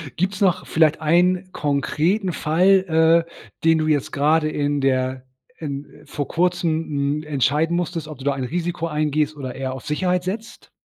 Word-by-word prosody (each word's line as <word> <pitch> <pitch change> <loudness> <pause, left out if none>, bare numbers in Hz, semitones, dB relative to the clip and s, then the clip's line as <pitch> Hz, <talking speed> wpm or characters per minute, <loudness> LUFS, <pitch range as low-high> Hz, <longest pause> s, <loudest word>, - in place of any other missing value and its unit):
Gibt's 190 +3 -2
noch 185 -4 +2
vielleicht 160 -1 +2
einen 180 +4 +2
konkreten 160 +7 0
Fall, 165 0 +3
äh, - - -20 0.3
den 165 0 +4
du 155 0 0
jetzt 145 -3 0
gerade 155 +2 +2
in 145 -1 -1
der 130 -1 0 0.3
in 145 -2 -5 0.2
vor 145 -2 -4
Kurzem, 175 -1 +1
h 165 - -5
m, 145 +1 -1
entscheiden 150 +3 +1
musstest, 170 -3 -3
ob 155 - -8
du 135 - -10
da 140 - +2
ein 135 -1 -4
Risiko 170 +4 -2
eingehst 150 0 0
oder 130 -3 -6
eher 130 -1 -3
auf 130 - -9
Sicherheit 180 +4 0
setzt? 215 +5 -6
155 Hz, 170 wpm, -22 LUFS, 145-175 Hz, 0.3 s, den